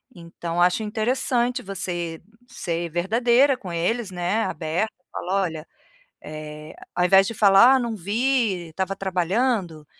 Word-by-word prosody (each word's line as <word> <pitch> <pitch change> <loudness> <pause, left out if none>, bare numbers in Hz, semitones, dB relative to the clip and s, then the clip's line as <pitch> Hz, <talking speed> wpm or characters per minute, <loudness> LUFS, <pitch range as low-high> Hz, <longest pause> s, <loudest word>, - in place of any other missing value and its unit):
Então, 170 0 -4
acho 180 +5 +3
interessante 240 +3 0
você 175 -4 -5 0.3
ser, 170 -1 -3
verdadeira 235 - +2
com 185 -6 -8
eles, 205 +6 -1
né, 180 +5 -1
aberta, 170 +6 -2 0.2
fala: 195 +2 -1
"Olha", 160 -3 -5 0.6
eh, 150 0 -9 0.2
ao 180 - +1
invés 195 +2 +5
de 230 - -4
falar: 205 +5 +6
"Ah - - +2
não 235 -2 -2
vi, 210 -2 0
estava 190 +4 -3
trabalhando", 185 -2 -1
190 Hz, 130 wpm, -23 LUFS, 170-225 Hz, 0.6 s, falar